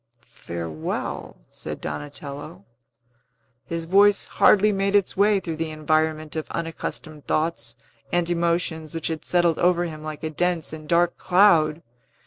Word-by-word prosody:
"Farewell," 85 -2 -5
said - - -7
Donatello. 140 - -7 1.0
His 165 -1 -3
voice 200 +3 +4
hardly 210 +1 +4
made 195 0 0
its 200 -2 +2
way 200 +1 +4
through 165 -4 -5
the 165 0 -2
environment 155 0 0
of 155 - -4
unaccustomed 160 -2 -5
thoughts 155 -8 0 0.4
and 175 -1 +1
emotions 170 -2 -1
which 165 - -2
had 160 -1 -4
settled 175 -2 +2
over 175 0 +3
him 155 -2 -7
like 155 0 -7
a 155 - -2
dense 175 -1 -1
and 155 -1 -9
dark 175 0 +2
cloud. 170 -5 +4
165 Hz, 135 wpm, -24 LUFS, 155-175 Hz, 1.0 s, voice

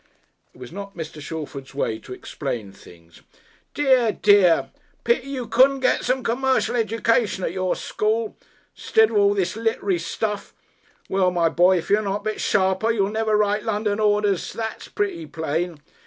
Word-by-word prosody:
It - - -22
was 125 -1 -9
not 200 +1 -8
Mr. 155 -2 -7
Shalford's 145 -3 -7
way 110 -5 -1
to - - -14
explain 120 -5 -5
things. 85 -3 -17 0.5
"Dear, 260 -6 +3
dear! 200 -5 +4 0.3
Pity 470 - +1
you 260 -3 -4
couldn't 260 +4 +4
get 255 - +2
some 255 +1 0
c'mercial 260 +2 +1
education 225 -2 +1
at - - -1
your 185 0 -1
school. 220 +1 -2 0.4
'Stid 220 0 +2
of 215 - 0
all 200 0 +4
this 185 -2 -1
lit'ry 220 -4 0
stuff. 210 +3 -4 0.5
Well, 190 -1 +2
my 170 -2 +1
boy, 180 +3 +4
if 170 - -4
y' 210 +1 +4
don't - - -6
'ussel 205 -1 0
a - - 0
bit 225 +2 +1
y'll 195 0 +1
never 220 -1 +1
write 210 0 +1
London 210 -1 -1
orders, 205 -3 +1
that's 225 -1 -5
pretty 385 -6 -3
plain. 160 +1 -3
205 Hz, 165 wpm, -23 LUFS, 175-225 Hz, 0.5 s, dear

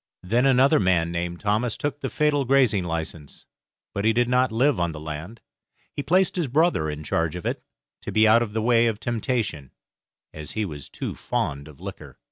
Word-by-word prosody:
Then 120 +8 +2
another 135 +1 +5
man 90 -4 +2
named 85 0 -3
Thomas 110 +3 0
took 145 -1 -3
the - - -3
fatal 150 -2 +1
grazing 125 -7 +3
license, 80 -3 -6 0.5
but 100 - -2
he 110 +1 +3
did 120 +1 +2
not 125 0 +2
live 130 +4 +2
on 85 -2 0
the 75 - -7
land. 80 +9 -7 0.5
He - - -3
placed 185 +5 +2
his 170 -5 0
brother 145 - +2
in 75 0 -5
charge 80 +1 -1
of 90 - -7
it, - - -2 0.4
to - - -6
be 110 0 +4
out 115 +2 +6
of 110 -3 -3
the 110 0 -1
way 115 0 +4
of 110 -2 -1
temptation, 115 - -2 0.6
as 75 -1 -7
he 110 -1 -1
was 75 -6 -8
too - - -5
fond 70 +1 -3
of 75 -3 -14
liquor. - - -9
110 Hz, 200 wpm, -24 LUFS, 85-125 Hz, 0.6 s, out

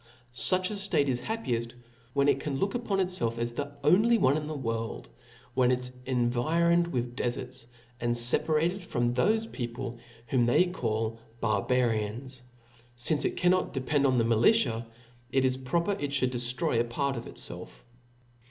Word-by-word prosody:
Such 185 - +3
a - - -3
ftate 195 -8 +1
is 125 -3 0
happieft, 120 - -3 0.4
when 140 0 +2
it 140 -1 +3
can 140 -1 -3
look 195 +7 0
upon 235 -5 -1
itfelf 180 -12 0
as 120 0 -2
the 145 +3 -4
only 215 +9 +5
one 135 -8 +3
in 150 -1 -3
the 155 -1 -4
world, 115 - -4 0.4
when 125 -1 +3
it 125 - +3
is 125 0 -5 0.2
environed 155 +8 +2
with 120 -5 -3
deferts, 125 0 -3 0.3
and 120 0 0
feparated 155 +9 +2
from 120 -8 -1
thofe 220 - +1
people 120 -1 -5 0.3
whom 120 0 +2
they 125 +9 +4
call 115 -9 -2 0.2
Barbarians. 115 +3 0 0.5
Since 130 +5 +1
it - - -1
can 180 0 +4
not 185 - +1
depend 140 +1 +1
on 130 -1 +2
the 115 - +3
militia, 115 - +3 0.4
it 135 0 +2
is 130 0 +2
proper 165 +9 -1
it 145 -8 -2
ftiould 130 -3 0
deftroy 125 +3 0
a - - +3
part 140 +3 -1
of - - -6
itfelf. - - -8
130 Hz, 165 wpm, -29 LUFS, 120-165 Hz, 0.5 s, only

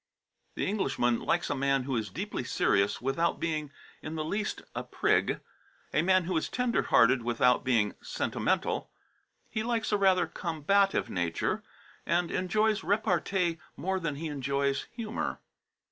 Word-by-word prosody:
The - - -1
Englishman 135 - +1
likes - - 0
a - - 0
man 135 -1 +1
who 130 0 -2
is 110 -3 -1
deeply - - -4
serious 100 +1 +1
without 165 +6 +1
being 155 -3 -2 0.3
in 160 - -5
the 155 -1 -2
least 210 +6 -2
a - - -3
prig; - - +1 0.5
a - - +3
man 185 +1 +4
who 180 +1 -2
is 160 - -1
tender 250 -1 +1
hearted 125 +2 +4
without 120 +1 +2
being 115 -5 +2
sentimental; - - -1 0.6
he 220 - -3
likes 230 -1 -1
a 210 - +3
rather 190 -2 +4
combative 185 +4 +1
nature, 85 -2 -1 0.4
and 170 0 +1
enjoys 215 +3 +1
repartee 180 -4 +1 0.2
more 190 +1 -1
than 165 -5 -2
he 155 +4 -5
enjoys 140 -1 -1
humour. 230 -1 -4
165 Hz, 145 wpm, -29 LUFS, 135-195 Hz, 0.6 s, man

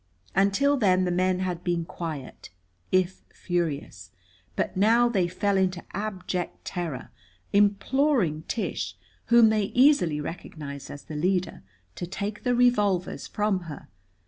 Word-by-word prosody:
Until 200 +10 +3
then 185 -6 +3
the 180 - 0
men 185 +1 +1
had 180 -2 -3
been 170 -2 -1
quiet, 155 -6 -7 0.4
if 185 0 +1
furious. 150 - -3 0.5
But - - -1
now 225 +5 +4
they 195 -7 +1
fell 195 +3 0
into 185 -2 0
abject 190 -3 -4
terror, 165 -7 -4 0.4
imploring 205 - +2
Tish, 130 - -3 0.3
whom 235 -1 +6
they 215 -2 +2
easily 245 - +4
recognized 150 -3 -7
as 145 - -9
the 155 - -8
leader, 180 +4 0 0.4
to 175 - -4
take 205 +3 -4
the 245 -1 +1
revolvers 210 -7 +2
from 210 -3 0
her. 145 - -9
185 Hz, 130 wpm, -26 LUFS, 170-210 Hz, 0.5 s, whom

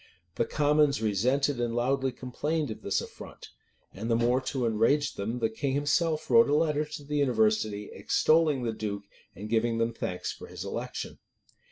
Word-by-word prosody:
The 115 - 0
commons 150 0 +2
resented 125 +6 +1
and 120 -1 -1
loudly 130 +2 +1
complained 145 +4 -3
of 110 - -7
this 100 - 0
affront; - - -11 0.4
and 110 +4 -5
the 115 - +3
more 120 +3 +2
to 130 -1 -2
enrage 115 +7 +2
them, 110 +5 -3
the 115 -2 +1
king 135 +4 -2
himself 155 +2 +1
wrote 115 +1 +6
a 145 - +3
letter 150 -1 +1
to 150 -1 -8
the 150 +1 -3
university, 110 -5 +1
extolling 155 -5 +2
the 115 -1 -1
duke, 105 -2 -4 0.3
and 105 - -7
giving 115 +1 +1
them 115 0 0
thanks 90 -5 -3
for - - -10
his - - -7
election. - - -5
125 Hz, 175 wpm, -28 LUFS, 110-145 Hz, 0.4 s, wrote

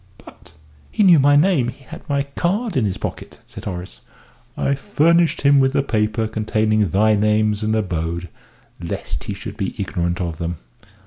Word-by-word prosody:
"But - - -17 0.4
he 210 - +1
knew 175 -5 +7
my 145 +1 +5
name 150 -5 +3
he 130 +2 -8
had 140 - -12
my 140 -1 +1
card 180 - -2
in 125 - +2
his 95 -2 -2
pocket," - - -7
said - - -11
Horace. 90 -9 -6 0.6
"I 140 - +1
furnished 170 +2 +2
him 140 0 +5
with 135 0 +2
the 140 -1 +2
paper 110 -2 0
containing 110 -1 0
thy 110 +5 +3
names 105 0 +1
and 110 0 0
abode, 85 -4 -2 0.5
lest - - -5
he - - -4
should - - -8
be - - -3
ignorant 85 0 -2
of 85 -3 -4
them." 85 +1 -3
110 Hz, 175 wpm, -20 LUFS, 100-140 Hz, 0.6 s, knew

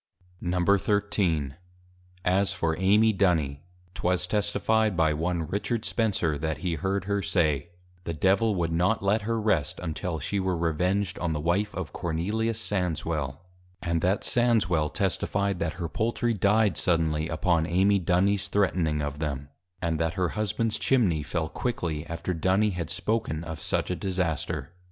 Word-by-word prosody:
XIII. 90 -4 +1 0.7
As 95 +2 +2
for 80 -1 0
Amy 105 +4 +4
Duny, 80 -8 +1 0.3
'twas 90 0 0
Testifi'd 105 +1 +1
by 80 -2 +3
one 85 +2 -1
Richard 105 +4 -2
Spencer 95 -10 0
that 80 -1 -2
he 85 +2 -2
heard 95 +4 -1
her 100 0 0
say, 80 -4 +1 0.4
The 85 - -2
Devil 100 +6 +3
would 85 -2 0
not 90 +6 +1
let 100 +3 +2
her 115 +2 -1
Rest; 105 -9 0
until 85 0 -3
she 100 +7 -2
were 95 -2 0
Revenged 90 +4 0
on 80 -2 -1
the 75 - -2
Wife 95 +7 +1
of 85 -6 -5
+Cornelius 105 +7 -1
Sandswel+. 80 -9 -2 0.4
And 85 -2 0
that 95 +4 +1
Sandswel 100 -11 +2
testifi'd, 100 -2 0
that 80 - -1
her 85 -1 -4
Poultry 115 +8 0
dy'd 105 0 +2
suddenly, 80 -2 +1
upon 80 0 +1
Amy 95 +4 +3
Dunys 95 +3 +2
threatning 85 -7 +1
of 75 0 -4
them; 70 -2 -3 0.3
and 80 -2 0
that 80 +1 0
her 90 -3 +1
Husbands 110 +1 -1
Chimney 100 - +2
fell, 80 +2 -2
quickly 85 -9 -3
after 85 +2 -3
Duny 95 +5 +2
had 85 -3 -4
spoken 105 -9 -1
of 80 -2 -6
such - - -1
a - - 0
disaster. 90 -3 -2
90 Hz, 150 wpm, -27 LUFS, 80-100 Hz, 0.7 s, Amy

